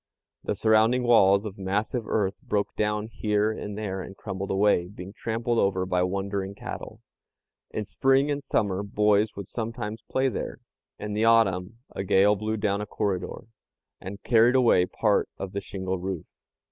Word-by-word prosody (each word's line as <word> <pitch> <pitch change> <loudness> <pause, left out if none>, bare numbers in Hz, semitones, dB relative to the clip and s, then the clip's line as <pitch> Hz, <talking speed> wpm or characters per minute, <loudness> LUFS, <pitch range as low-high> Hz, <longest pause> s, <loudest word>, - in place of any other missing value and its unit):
The - - -1
surrounding 110 +3 +3
walls 100 -4 +5
of 100 -1 -7
massive 105 +5 -2
earth 100 0 -1
broke 105 -6 -2
down 105 0 0
here 110 -1 0
and 105 -1 -6
there 95 -3 -3
and 95 +1 -9
crumbled 95 -1 -5
away, 95 -3 +2
being 95 0 -10
trampled 115 +1 -1
over 95 -1 +1
by 90 -1 +1
wandering 100 +1 -2
cattle. - - -8 0.7
In 105 - -4
spring 135 +6 +2
and 145 0 -2
summer 100 -7 0
boys 105 +1 +2
would 100 -2 -7
sometimes 115 -1 -5
play 130 +1 +1
there. 125 - -4 0.4
In 105 0 -5
the 110 +2 +1
autumn 110 -3 +3 0.2
a - - -2
gale 100 +2 +4
blew 110 +2 -2
down 105 -1 0
a 105 - -5
corridor, 100 +1 -3 0.6
and 100 +2 -8
carried 120 +1 +4
away 115 -8 +4
part - - +1
of 95 - -5
the 100 - -3
shingle 95 -1 -4
roof. 95 -3 -4
105 Hz, 165 wpm, -26 LUFS, 95-110 Hz, 0.7 s, walls